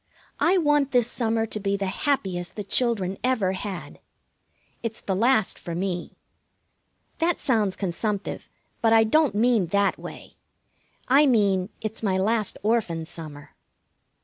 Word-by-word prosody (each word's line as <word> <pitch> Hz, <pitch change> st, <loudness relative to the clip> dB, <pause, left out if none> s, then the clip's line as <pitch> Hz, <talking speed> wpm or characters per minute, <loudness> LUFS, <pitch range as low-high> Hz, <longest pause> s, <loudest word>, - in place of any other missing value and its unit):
I 370 Hz, +3 st, +4 dB
want 295 Hz, -4 st, +2 dB
this 245 Hz, -2 st, +4 dB
summer 225 Hz, -2 st, -1 dB
to 215 Hz, -1 st, -4 dB
be 200 Hz, 0 st, -1 dB
the 200 Hz, -, -2 dB
happiest 185 Hz, -4 st, -1 dB
the 210 Hz, -, -4 dB
children 200 Hz, -4 st, 0 dB
ever 235 Hz, -7 st, +1 dB
had. 190 Hz, -1 st, -6 dB, 0.8 s
It's 230 Hz, -1 st, -4 dB
the 190 Hz, -, -2 dB
last 225 Hz, 0 st, +2 dB
for 170 Hz, -, -6 dB
me. 180 Hz, -1 st, -3 dB, 1.0 s
That 335 Hz, +1 st, +1 dB
sounds 215 Hz, -7 st, +1 dB
consumptive, 200 Hz, +2 st, -3 dB, 0.3 s
but 225 Hz, -1 st, +4 dB
I 225 Hz, 0 st, +6 dB
don't 285 Hz, +2 st, +2 dB
mean 225 Hz, -4 st, +3 dB
that 200 Hz, +3 st, +1 dB
way. -, -, -10 dB, 0.7 s
I 280 Hz, +3 st, +5 dB
mean 200 Hz, -6 st, +2 dB
it's 215 Hz, 0 st, -5 dB
my 195 Hz, -4 st, +1 dB
last 210 Hz, +2 st, +1 dB
Orphan 205 Hz, -8 st, 0 dB
summer. 155 Hz, -3 st, -10 dB
210 Hz, 140 wpm, -25 LUFS, 190-240 Hz, 1.0 s, I